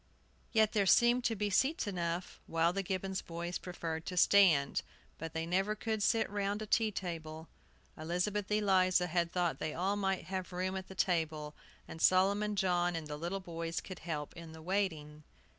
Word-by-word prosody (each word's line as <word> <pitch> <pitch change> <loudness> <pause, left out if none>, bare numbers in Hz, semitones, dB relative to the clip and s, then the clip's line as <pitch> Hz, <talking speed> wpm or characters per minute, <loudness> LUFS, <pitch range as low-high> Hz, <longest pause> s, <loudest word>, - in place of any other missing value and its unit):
Yet 220 -2 +4
there 200 -3 +2
seemed 240 +4 +5
to 225 - +1
be 205 0 -1
seats 270 - +2
enough 175 -3 -3
while 165 +1 +2
the 195 - -1
Gibbons 190 0 -3
boys 170 +1 -5
preferred 165 -3 -5
to 180 - -4
stand. 175 -8 +5 0.4
But 165 0 -6
they 160 0 -2
never 190 +5 +1
could 220 0 -2
sit 225 +2 +2
round 205 0 -2
a 215 - -4
tea 220 +1 +2
table. 165 -4 -5 0.5
Elizabeth 180 +6 -2
Eliza 185 -4 +3
had 170 0 0
thought 175 -2 0
they 155 - -3
all 190 +4 0
might 195 -2 -1
have 185 -1 -4
room 185 +1 -2
at 190 0 -5
the 190 - -10
table, 160 -5 0 0.3
and 160 - -8
Solomon 200 +3 +3
John 175 -2 +1
and 165 -1 -4
the 150 0 -5
little 170 +6 -3
boys 165 -2 -4
could 185 -2 -9
help 150 -3 -4
in 165 -2 -9
the 160 - -11
waiting. 160 -5 -2
180 Hz, 180 wpm, -33 LUFS, 165-200 Hz, 0.5 s, seemed